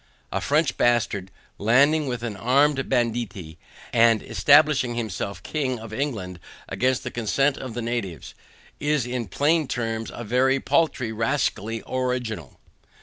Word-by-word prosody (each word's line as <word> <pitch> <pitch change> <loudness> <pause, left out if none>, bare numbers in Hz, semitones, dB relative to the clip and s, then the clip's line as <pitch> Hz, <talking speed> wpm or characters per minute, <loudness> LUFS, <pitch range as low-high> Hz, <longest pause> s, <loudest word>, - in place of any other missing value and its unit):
A - - -2
French 150 -2 +1
bastard 110 -5 +1 0.3
landing 140 +8 +4
with 125 -2 -3
an 115 -4 -3
armed 135 +5 +2
banditti, 115 - -2 0.3
and 115 -2 +4
establishing 145 -4 +4
himself 110 -3 -4
king 135 -5 -2
of 110 -1 -9
England 105 -10 -3 0.3
against 130 0 0
the - - -5
consent 135 +5 +1
of 130 -4 -7
the 120 - -3
natives, 115 -8 -4 0.5
is 145 -3 +1
in 125 -2 -3
plain 150 - +1
terms 115 -2 -3
a 120 - -7
very 130 +4 +2
paltry 135 -7 +1
rascally 115 -2 -1
original. 125 - -3
120 Hz, 135 wpm, -24 LUFS, 110-135 Hz, 0.5 s, landing